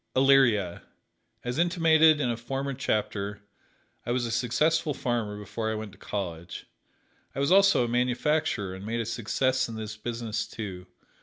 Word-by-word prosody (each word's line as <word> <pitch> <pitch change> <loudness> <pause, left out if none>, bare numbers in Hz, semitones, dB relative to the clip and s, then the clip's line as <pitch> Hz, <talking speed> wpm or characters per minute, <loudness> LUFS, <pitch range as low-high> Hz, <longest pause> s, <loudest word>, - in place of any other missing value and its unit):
Elyria: 130 -9 +4 0.6
As 125 +4 -3
intimated 160 -3 +5
in 125 -5 +1
a - - -1
former 135 +4 -4
chapter, 105 -4 -2 0.6
I - - -7
was 120 0 0
a 115 - -3
successful 145 +6 +1
farmer 115 -4 -2
before 110 +2 -4
I - - -2
went 110 -1 -6
to - - -19
college. 85 -5 -5 0.7
I - - -3
was 140 +4 +1
also 195 -9 +5
a - - -3
manufacturer, 125 -3 0
and 95 +1 -8
made 115 +3 -2
a 115 - -1
success 130 +4 0
in 115 - -6
this 110 -1 -6
business, 115 0 -3
too. 95 -4 -7
120 Hz, 160 wpm, -27 LUFS, 105-135 Hz, 0.7 s, intimated